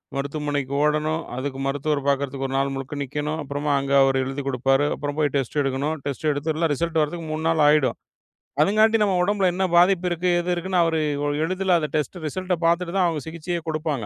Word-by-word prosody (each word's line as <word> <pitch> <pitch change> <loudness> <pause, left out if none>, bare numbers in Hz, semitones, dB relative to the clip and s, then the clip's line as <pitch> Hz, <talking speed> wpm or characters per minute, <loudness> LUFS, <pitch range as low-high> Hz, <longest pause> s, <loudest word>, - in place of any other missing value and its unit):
மருத்துவமனைக்கு 140 -1 -3
ஓடணும். 155 +2 0
அதுக்கு 135 +1 -4
மருத்துவர் 145 +1 -1
பாக்குறதுக்கு 140 -1 0
1 135 - -6
நாள் 135 0 0
முழுக்க 135 +2 -6
நிக்கணும். 150 +3 -3
அப்புறமா 145 +1 -2
அங்க 140 0 -4
அவரு 135 0 +2
எழுதிக் 135 +1 -5
குடுப்பாரு. 135 +2 +2
அப்புறம் 145 0 -5
போய் 145 -3 +2
டெஸ்ட் 135 +1 -1
எடுக்கணும். 140 +3 -1
டெஸ்ட் 140 +2 -3
எடுத்த 155 +3 -1
ரிசல்ட் 165 +2 -1
வர்றதுக்கு 160 +2 -3
3 155 +1 -3
நாள் 165 -1 +2
ஆயிடும். 150 -3 +3 0.6
அதுங்காட்டி 215 +6 +4
நம்ம 195 -3 +1
ஒடம்புல 200 0 +1
என்ன 190 +2 -1
பாதிப்பு 180 0 +4
இருக்கு? 175 +1 -1
ஏது 175 +1 -3
இருக்குன்னு 180 0 0
அவரு 165 -1 +1 0.5
எளிதுல 185 +1 0
அந்த 150 - -2
டெஸ்ட் 155 +4 -1
ரிசல்ட் 185 +4 -2
பாத்துட்டு 170 +1 +1
தான் 185 - +3
அவங்க 160 -3 -2
சிகிச்சையே 170 +2 -4
குடுப்பாங்க. 155 -6 -2
150 Hz, 185 wpm, -23 LUFS, 140-170 Hz, 0.6 s, அதுங்காட்டி